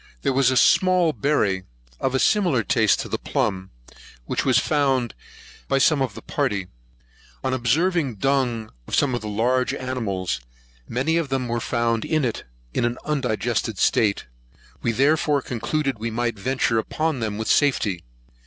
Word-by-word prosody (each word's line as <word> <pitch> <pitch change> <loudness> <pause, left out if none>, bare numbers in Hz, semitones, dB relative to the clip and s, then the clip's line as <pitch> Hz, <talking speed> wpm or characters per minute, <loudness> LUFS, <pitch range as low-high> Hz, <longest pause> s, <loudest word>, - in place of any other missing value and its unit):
There 135 - +1
was 135 -1 +4
a 130 - +1
small 180 +2 +4
berry, 105 -7 +1 0.4
of 135 0 0
a - - +2
similar 175 - +2
taste - - +2
to - - -6
the - - -3
plumb, 95 0 -2 0.6
which - - -1
was 130 -3 +3
found 135 -5 +1 0.5
by 135 - +2
some 140 +1 +3
of 125 -7 -1
the - - -10
party. 100 -3 -2 0.7
On 130 -1 0
observing 140 +3 +1
the - - -21
dung 125 -5 0 0.2
of - - -1
some 140 -3 +2
of 120 - -2
the 110 - -6
larger 125 +5 +1
animals, 110 - -3 0.5
many 135 +8 0
of 165 -4 -1
them 130 -2 -1
were 120 0 -1
found 115 -1 0
in 155 -4 0
it, 115 - -3 0.3
in - - 0
an 120 +1 0
undigested 120 -6 -1
state; 105 0 +2 0.6
we 115 - +1
therefore 145 +4 +2
concluded 130 +2 -2
we 115 +1 -2
might 120 +1 -1
venture 120 0 +1
upon 155 +5 -2
them 110 -3 -2
with 110 - -3
safety. 105 - +2
125 Hz, 165 wpm, -23 LUFS, 110-140 Hz, 0.7 s, was